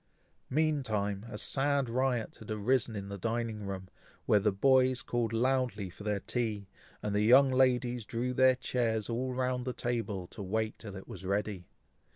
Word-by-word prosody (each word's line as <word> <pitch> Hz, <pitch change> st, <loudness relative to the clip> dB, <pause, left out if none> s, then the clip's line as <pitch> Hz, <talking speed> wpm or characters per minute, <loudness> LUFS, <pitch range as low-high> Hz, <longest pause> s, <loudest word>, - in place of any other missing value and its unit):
Mean 155 Hz, +1 st, +2 dB
time, 105 Hz, -3 st, -2 dB
a -, -, -6 dB
sad 140 Hz, -1 st, +1 dB
riot 125 Hz, -1 st, -1 dB
had 110 Hz, -, -12 dB
arisen 110 Hz, +2 st, +1 dB
in 100 Hz, -1 st, -5 dB
the 100 Hz, 0 st, -6 dB
dining 115 Hz, -1 st, -2 dB
room, 95 Hz, -1 st, -5 dB, 0.4 s
where 105 Hz, -, +5 dB
the 105 Hz, +1 st, +2 dB
boys 130 Hz, +4 st, +3 dB
called 120 Hz, -2 st, -1 dB
loudly 115 Hz, -5 st, 0 dB
for 100 Hz, -, -11 dB
their 105 Hz, -1 st, 0 dB
tea; 110 Hz, -5 st, -2 dB, 0.4 s
and 105 Hz, -, -1 dB
the 105 Hz, -, +2 dB
young 130 Hz, +5 st, +6 dB
ladies 125 Hz, -2 st, +2 dB
drew 120 Hz, +4 st, -2 dB
their 130 Hz, 0 st, +5 dB
chairs 115 Hz, -4 st, -1 dB
all 130 Hz, +3 st, -1 dB
round 125 Hz, 0 st, -1 dB
the 125 Hz, 0 st, -3 dB
table, 115 Hz, -7 st, -2 dB
to -, -, -9 dB
wait 110 Hz, +3 st, -2 dB
till 100 Hz, -3 st, -8 dB
it 95 Hz, -, -9 dB
was -, -, -9 dB
ready. 100 Hz, -1 st, -2 dB
115 Hz, 180 wpm, -31 LUFS, 105-130 Hz, 0.4 s, young